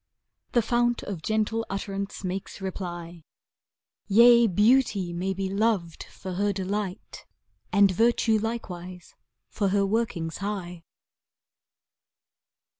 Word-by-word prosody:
The 240 - +3
fount 240 +1 +1
of 190 -6 -5
gentle 220 +4 0
utterance 195 0 -4
makes 185 +2 -5
reply, 175 -3 -6 0.4
" - - -67
Yea, 235 +3 +7
Beauty 210 -2 +2
may 180 +3 -2
be 190 0 -2
loved 195 -4 -1
for 185 - -8
her 205 +3 +1
delight. 195 +1 -4 0.4
And 200 -1 +5
Virtue 225 +2 +2
likewise 185 -6 -6 0.4
for 205 - 0
her 200 +1 +2
workings 195 -6 -1
high." 180 -5 -5
200 Hz, 110 wpm, -26 LUFS, 180-220 Hz, 0.4 s, Yea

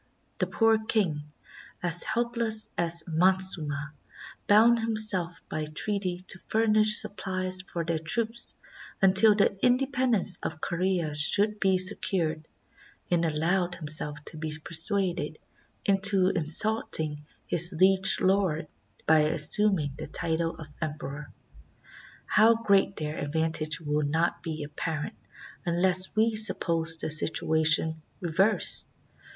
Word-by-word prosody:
The - - 0
poor 225 -1 +1
king, 180 -10 -1 0.6
as 175 0 +1
helpless 230 -1 -1
as 170 0 +4
Montezuma, 165 -4 0 0.5
bound 230 +3 +4
himself 215 -7 0
by 155 0 -5
treaty 185 +3 -2
to 190 - -3
furnish 215 -1 +3
supplies 185 -2 -2
for 170 -2 -6
their 165 -1 -2
troops 230 +8 -1 0.4
until 195 +2 +6
the 200 -1 +1
independence 250 -7 +1
of 160 - -6
Corea 175 -2 -2
should 205 +8 -1
be 190 -1 +1
se 185 +2 +3
cured, 160 -4 -3 0.6
and 170 -1 +1
allowed 175 +3 -1
himself 150 -2 -3
to 155 - -10
be 155 -1 -6
persuaded 175 +4 -3 0.5
into 195 -1 +3
insult 190 +7 +2
ing 150 -1 -5 0.2
his 175 +1 +2
liege 190 +2 +5
lord 185 -5 0 0.4
by 160 0 +4
assuming 155 +1 +1
the - - -7
title 165 +2 -1
of 155 - -11
emperor. 150 -2 -7 0.9
How 220 +3 +3
great 200 -3 +1
their 155 0 -6
advantage 155 +1 -1
will 150 -1 -2
not 160 +4 -1
be 160 -3 -6
apparent 150 +1 -5 0.5
unless 185 +2 +1
we 220 +1 +1
suppose 165 -6 +3
the 160 - -3
situation 160 +1 +2 0.2
reversed. 190 +5 +2
175 Hz, 120 wpm, -26 LUFS, 160-205 Hz, 0.9 s, until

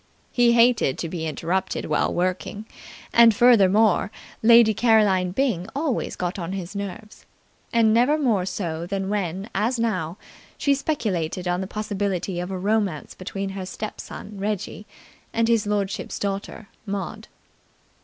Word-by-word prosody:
He 240 -1 +4
hated 235 - +4
to 165 - -3
be 160 -1 -4
interrupted 170 +4 -2
while 150 - +1
working, 185 +4 -2 0.5
and, 230 -2 +7
furthermore, 215 -4 +5 0.3
Lady 230 -1 +7
Caroline 210 -5 +3
Byng 195 -4 0
always 285 -3 -1
got 180 +2 -3
on 175 +2 -4
his 190 0 -6
nerves, 200 +2 -7 0.4
and 225 -2 +4
never 250 +7 +4
more 220 -11 +1
so 170 -3 -3
than 195 0 -2
when, 195 -1 -2
as 225 +6 0
now, 185 -7 -1 0.4
she 280 - +2
speculated 190 - -2
on 175 +1 0
the 190 - -4
possibility 200 -3 -2
of 180 +1 -4
a 190 - -3
romance 200 -4 -1
between 195 +1 -5
her 190 -1 -6
step 215 +3 -6
son 205 -1 -9
Reggie 210 +1 -4 0.5
and 230 0 +2
his 230 -3 +2
lordship's 205 0 -2
daughter 200 +1 -4 0.2
Maud. 200 0 -5
200 Hz, 145 wpm, -24 LUFS, 185-225 Hz, 0.5 s, and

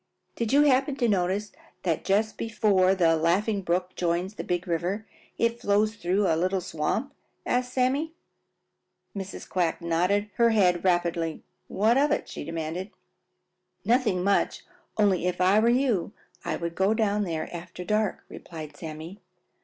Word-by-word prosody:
"Did 230 -2 -2
you 285 +2 +6
happen 270 0 +3
to 245 -3 +1
notice 195 +1 0 0.3
that 165 -4 0
just 210 +3 +1
before 200 -4 +2
the 165 -3 +3
Laughing 195 +6 +1
Brook 180 +1 -1
joins 175 +3 -1
the - - -6
Big 180 +1 -2
River 180 +5 -2 0.3
it 230 0 0
flows 210 +1 +2
through 195 0 0
a 165 - +3
little 185 +3 0
swamp?" 185 - -2 0.3
asked 250 0 0
Sammy. 270 +5 +1 1.0
Mrs. 195 -1 -6
Quack 175 -3 0
nodded 180 +5 0
her 235 0 +5
head 185 -6 +3
rapidly. 170 -3 0 0.2
"What 220 +6 +2
of 290 +1 +3
it?" 295 - -1
she - - -7
demanded. 165 +4 -4 1.0
"Nothing 220 -5 +2
much, 200 +1 +1 0.3
only 195 -4 +2
if 180 - -2
I 190 +3 +4
were 230 +2 +3
you 240 -7 +1 0.3
I - - -2
would 170 0 -4
go 195 +5 +2
down 210 -2 +1
there 165 -4 -3
after 180 +1 -8
dark," 215 0 0
replied 155 -3 -9
Sammy. 160 +5 -8
190 Hz, 155 wpm, -26 LUFS, 175-220 Hz, 1.0 s, you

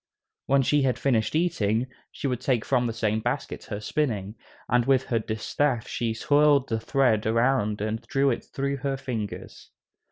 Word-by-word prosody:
When 135 0 +4
she 145 +3 +2
had 130 -3 +1
finished 125 -2 +1
eating, 125 -10 +1 0.3
she - - -7
would 125 -3 -1
take 125 -4 0
from 125 -2 +2
the - - -1
same 110 -1 0
basket - - -3
her 105 - -5
spinning, 105 -5 -2 0.3
and 120 -1 +2
with 135 -1 +4
her 120 -4 0
distaff 115 +4 -1
she 115 -1 -2
twirled 145 +1 +3
the 115 -1 0
thread 115 -3 +1
around 115 -2 +1
and 110 +2 -2
drew 135 0 +2
it 120 - -3
through 140 0 -3
her 135 0 -2
fingers. 115 -6 -6
125 Hz, 170 wpm, -26 LUFS, 110-135 Hz, 0.3 s, When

